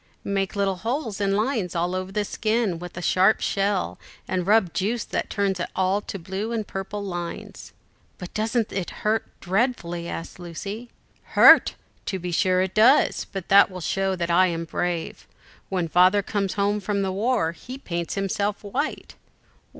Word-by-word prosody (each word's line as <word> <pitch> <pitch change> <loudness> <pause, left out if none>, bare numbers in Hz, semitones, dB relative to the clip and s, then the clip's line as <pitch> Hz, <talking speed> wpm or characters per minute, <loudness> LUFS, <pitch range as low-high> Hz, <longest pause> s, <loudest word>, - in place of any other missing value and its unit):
"Make 195 0 -1
little 195 -2 0
holes, 225 - -3
and 195 0 +2
lines 215 -6 -1
all 175 +2 0
over 185 0 -3
the 210 +1 -1
skin 215 -5 0
with 175 0 -9
a 175 - -5
sharp 190 +5 +4
shell, 200 -1 -1 0.3
and 185 -1 -2
rub 210 -3 +4
in - - -30
juice 220 +5 -1
that - - -3
turns 195 -2 0
it 175 - -3
all 190 +2 +1
to 200 - -6
blue 195 +5 -4
and 225 -2 -2
purple 195 +2 -5
lines." 175 -3 -6 0.5
"But 180 -2 -9
doesn't 220 +1 0
it 190 -3 -3 0.2
hurt 220 +1 +1
dreadfully?" 175 -4 -1
asked 165 - -7
Lucy. 200 +7 -7 0.5
"Hurt! - - +8 0.3
to 190 - -1
be 180 -1 -5
sure 185 +1 +2
it 190 - -4
does, 235 +7 +4
but 195 -3 -5
that 200 +1 +7
will 185 -1 -8
show 190 +2 0
that 170 -1 -2
I 185 +2 +5
am 165 -1 -3
brave. 170 0 -3 0.4
When 180 -3 -1
Father 185 +5 +4
comes 200 -2 -1
home 205 +1 +1
from 200 0 -1
the 190 - -1
war, 205 -3 +1
he 250 +10 -9
paints 170 -9 -4
himself 200 +1 -1
white." 265 +9 -3
195 Hz, 175 wpm, -24 LUFS, 180-210 Hz, 0.5 s, Hurt